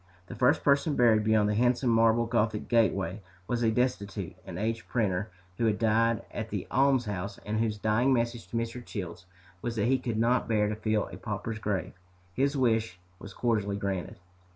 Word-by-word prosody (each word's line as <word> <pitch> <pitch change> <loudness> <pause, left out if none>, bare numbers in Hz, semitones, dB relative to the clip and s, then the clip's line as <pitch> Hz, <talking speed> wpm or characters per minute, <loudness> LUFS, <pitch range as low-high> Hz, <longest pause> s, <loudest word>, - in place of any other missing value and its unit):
The - - -9
first 125 +3 +2
person 140 +1 +3
buried 110 -3 +4
beyond 110 -1 +3
the 105 - +1
handsome 120 +2 +2
marble 115 +1 +4
gothic 110 -2 0
gateway 100 -4 +1 0.2
was 120 +4 -2
a 115 - +3
destitute 110 -4 -1
and - - -8
aged 115 +3 -2
printer 105 -3 0 0.3
who 115 - +2
had 105 -1 +1
died 115 0 +2
at - - -5
the - - -3
almshouse 115 -8 +1
and 110 +1 -1
whose 110 -2 0
dying 110 +5 +2
message 120 -2 0
to 115 - -4
Mr. 115 +1 -3
Childs 90 -5 -7 0.3
was 120 -1 -3
that 105 - +1
he 130 +2 +2
could 120 -3 -3
not 120 +3 +2
bear 105 -2 +2
to 105 - -2
fill 110 -1 0
a - - -8
pauper's 110 +1 -4
grave. 105 -3 -2 0.4
His 140 +6 +1
wish 110 -7 +1 0.2
was 100 -1 -10
cordially 105 -4 0
granted. 95 -3 -3
110 Hz, 185 wpm, -29 LUFS, 105-120 Hz, 0.4 s, buried